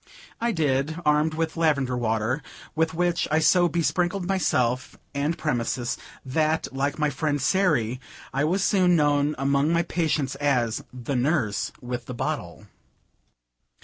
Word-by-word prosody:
I 235 +1 +1
did, 150 -3 0
armed 150 +1 +3
with 160 0 -2
lavender 140 -6 +1
water, 115 +3 0 0.3
with 160 0 0
which 175 0 +1
I 155 - +2
so 175 +3 +4
besprinkled 175 +3 0
myself 125 -10 0 0.2
and 145 +4 -1
premises, 120 -3 -1 0.3
that, 155 +4 +1
like 140 +1 -1
my 150 -1 +1
friend 145 +1 -1
Sairy, 130 - +1 0.3
I 140 +2 +1
was 180 +5 +1
soon 185 -4 +4
known 145 -1 +2
among 140 +3 +2
my 170 0 +2
patients 160 -5 -1
as 125 -6 0
"the 130 +2 -4
nurse 125 -6 0
with 120 -1 -5
the 125 - -5
bottle." - - -4
150 Hz, 140 wpm, -25 LUFS, 130-165 Hz, 0.3 s, so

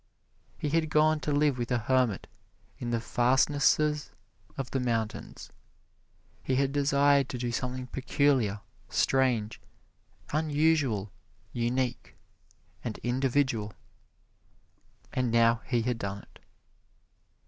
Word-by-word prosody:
He 150 - -2
had 160 +1 +1
gone 155 +1 +3
to 150 - -3
live 145 -2 +2
with 120 - -2
a 125 - +2
hermit 120 -2 +1 0.5
in 120 - -4
the 120 -1 0
fastnesses 140 +5 +2 0.5
of 135 -2 -4
the 135 - 0
mountains. 115 -3 -3 0.9
He 130 - -1
had 135 +1 +1
desired 140 -1 +3
to 130 - -4
do 120 0 -2
something 125 +2 -3
peculiar, 130 -5 +1 0.3
strange, 125 -5 +1 0.7
unusual, 150 -9 +1 0.4
unique 120 +1 -2 0.7
and 115 - -4
individual, 125 -4 0 1.4
and 125 -1 0
now 115 0 +4
he 120 -3 +1
had 125 -1 -1
done 100 -1 -4
it. - - -21
130 Hz, 110 wpm, -29 LUFS, 120-145 Hz, 1.4 s, now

